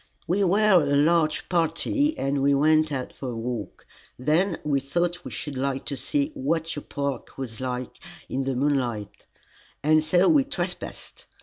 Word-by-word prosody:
"We 185 +4 +1
were 195 0 +5
a 145 -1 +1
large 155 +1 +2
party 195 - +1
and 135 0 0
we 140 +1 +4
went 155 +2 +3
out 130 -3 -4
for 130 - -6
a 120 - -5
walk. 115 -2 -5 0.3
Then 160 +7 +1
we 145 -2 +1
thought 175 +6 -1
we - - -6
should 145 -2 -5
like 135 0 -2
to 140 - -3
see 285 - -1
what 165 - -1
your 145 - -5
park 140 -1 -4
was 125 -4 -6
like 125 -1 -4 0.3
in 135 0 -2
the 135 -1 -1
moonlight, 125 -7 -1 0.6
and 155 +1 +4
so 175 +4 +3
we 295 -4 +5
trespassed. 280 - -6
150 Hz, 170 wpm, -25 LUFS, 135-175 Hz, 0.6 s, were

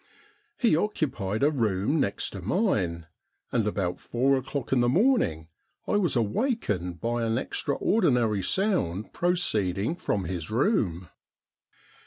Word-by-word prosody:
He 235 -11 +3
occupied 135 - -1
a 150 - +4
room 115 +2 0
next 100 -7 -1
to 95 - -7
mine, 90 - 0 0.5
and 115 -4 +1
about 95 -4 -2
four 135 +3 +1
o'clock 130 0 -4
in 130 - +3
the 120 0 +3
morning 145 - +2 0.4
I - - +2
was 180 -9 +1
awakened 105 - -1
by 120 +1 -1
an 115 0 0
extraordinary 125 - +1
sound 110 - 0
proceeding 110 - +1
from 105 - -2
his 85 -2 -4
room. 110 - 0
115 Hz, 125 wpm, -27 LUFS, 95-160 Hz, 0.5 s, a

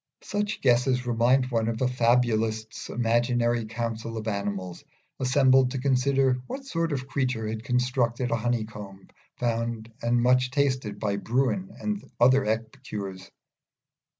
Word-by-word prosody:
Such 205 +1 -2
guesses 125 0 +2
remind 125 +2 +2
one 115 -2 +1
of 115 0 -2
a 130 - +2
fabulist's 115 -3 +1
imaginary 120 0 +1
council 115 0 -4
of 110 0 -5
animals 100 -3 -3 0.4
assembled 130 0 +4
to 130 - -4
consider 130 0 +2
what 270 0 -6
sort 165 -9 -1
of 135 -2 -3
creature 125 -5 -1
had 110 0 -4
constructed 125 -1 0
a - - +3
honeycomb 105 -4 -4 0.3
found 115 -1 -2
and 120 +1 +2
much 125 0 +4
tasted 130 -6 0
by 100 -2 -1
Bruin 135 - 0
and 210 -1 -3 0.2
other 130 +3 +5
epicures. 105 -4 -4
120 Hz, 130 wpm, -26 LUFS, 110-130 Hz, 0.4 s, other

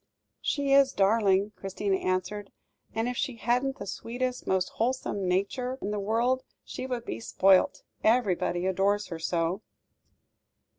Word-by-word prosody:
"She 280 -1 +1
is 275 -1 +5
a - - -28
darling," 200 0 +3
Christina 195 0 -1
answered, 185 +3 -2 0.4
"and 225 +1 0
if 250 - -2
she 260 - -1
hadn't 245 +4 0
the 200 - -6
sweetest, 245 +5 -4
most 185 -1 +1
wholesome 225 -5 -1
nature 245 +8 -1
in 205 - -3
the 210 - -1
world, 235 +5 +1 0.2
she 260 - -6
would 245 -2 -3
be 110 - -4
spoilt, 190 +10 +3 0.2
everybody 195 -6 +2
adores 195 +2 +1
her 165 -2 -5
so!" 165 +3 -1
205 Hz, 145 wpm, -28 LUFS, 190-245 Hz, 0.4 s, is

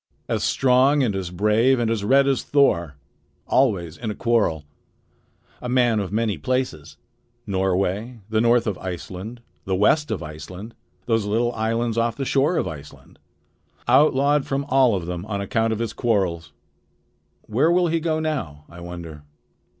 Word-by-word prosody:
"As - - -1
strong 135 +2 +3
and 110 -6 0
as 95 -2 -3
brave 105 +8 +2
and 115 -2 0
as 110 -3 -1
red 135 +5 +4
as 135 -2 +1
Thor! 85 - +2 0.5
Always 95 - +1
in 115 - -5
a 105 - -4
quarrel. 110 -10 +1 1.0
A 125 - -5
man 120 -3 +3
of 95 -3 -4
many 105 -5 -1
places 80 - -3 0.5
Norway, 95 +4 -1
the 110 0 +1
north 120 0 +3
of 105 -5 -3
Iceland, 95 +5 -7 0.2
the 95 - 0
west 150 +10 +2
of 110 - -3
Iceland, 90 +8 -9 0.3
those 115 -3 +1
little 115 +4 0
islands 115 +1 -1
off 115 0 0
the 135 - -3
shore 145 +6 +2
of - - 0
Iceland. 75 -2 -11 0.7
Outlawed 140 +2 +3
from 140 +1 -2
all 130 -4 +4
of 90 -3 -3
them 90 0 -5
on 100 -2 -3
account 115 +2 0
of 110 - -1
his 115 -1 -3
quarrels. 95 -9 -1 0.9
Where 130 +10 +1
will 180 +1 +3
he 165 0 +1
go 160 -1 -1
now, 105 - -4
I 85 - -12
wonder?" 85 -3 -8
110 Hz, 160 wpm, -23 LUFS, 95-130 Hz, 1.0 s, red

